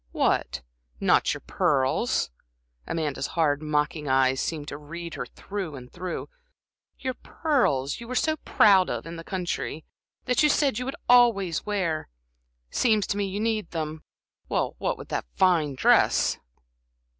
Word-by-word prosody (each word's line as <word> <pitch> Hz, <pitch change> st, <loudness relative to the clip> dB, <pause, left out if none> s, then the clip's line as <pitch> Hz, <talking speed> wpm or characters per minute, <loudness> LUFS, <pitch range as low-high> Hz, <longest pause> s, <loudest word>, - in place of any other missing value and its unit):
"What, 65 Hz, +1 st, 0 dB, 0.4 s
not -, -, +3 dB
your -, -, -4 dB
pearls?" 130 Hz, -, +1 dB, 0.6 s
Amanda's 150 Hz, -4 st, -2 dB
hard, 150 Hz, -3 st, +2 dB
mocking 150 Hz, 0 st, -1 dB
eyes 130 Hz, 0 st, +3 dB
seemed 150 Hz, -3 st, -3 dB
to 140 Hz, -, -6 dB
read 170 Hz, +3 st, -7 dB
her -, -, -5 dB
through 195 Hz, -7 st, -6 dB
and 125 Hz, -2 st, -11 dB
through. 180 Hz, 0 st, -5 dB, 0.7 s
"Your 260 Hz, -1 st, -3 dB
pearls 235 Hz, -, 0 dB
you 235 Hz, -, -9 dB
were 255 Hz, -, -4 dB
so 315 Hz, +4 st, +1 dB
proud 195 Hz, -9 st, +4 dB
of -, -, -3 dB
in 165 Hz, +1 st, -7 dB
the 165 Hz, -, -7 dB
country, 175 Hz, -4 st, -3 dB, 0.4 s
that 250 Hz, -1 st, +2 dB
you 300 Hz, -, +5 dB
said 280 Hz, -6 st, +2 dB
you'd 255 Hz, +2 st, -3 dB
always 230 Hz, -9 st, +4 dB
wear. 185 Hz, -7 st, -1 dB, 0.6 s
Seems 215 Hz, -5 st, +2 dB
to -, -, -6 dB
me 200 Hz, -1 st, 0 dB
you 195 Hz, +2 st, -4 dB
need 215 Hz, -4 st, -1 dB
them 155 Hz, -2 st, -4 dB, 0.5 s
with -, -, -2 dB
that -, -, -2 dB
fine 165 Hz, -7 st, +3 dB
dress!" -, -, +3 dB
170 Hz, 145 wpm, -26 LUFS, 150-215 Hz, 0.7 s, you